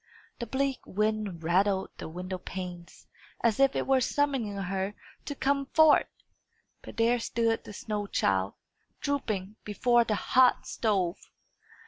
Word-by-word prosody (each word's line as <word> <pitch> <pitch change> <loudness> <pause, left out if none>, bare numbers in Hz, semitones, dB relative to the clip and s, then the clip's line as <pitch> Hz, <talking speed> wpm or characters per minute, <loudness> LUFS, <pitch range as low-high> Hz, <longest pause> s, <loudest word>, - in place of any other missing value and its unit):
The 235 - -4
bleak 270 +2 -1
wind 210 -4 -1
rattled 190 +3 +1
the - - -6
window 180 +2 -5
panes, 180 -2 -8 0.4
as 230 -1 +2
if 275 0 +4
it - - 0
were 265 -1 +3
summoning 265 -6 0
her 195 +1 -2 0.3
to 285 - -4
come 275 0 0
forth. 315 +1 +5 0.7
But - - -11
there 235 +1 +3
stood 230 0 0
the 210 - -9
snow 210 -1 -4
child, 95 - 0 0.4
drooping, 215 -8 -2
before 240 +3 +3
the 220 -2 -1
hot 255 +4 +3
stove! 195 -5 0
215 Hz, 135 wpm, -29 LUFS, 190-255 Hz, 0.7 s, forth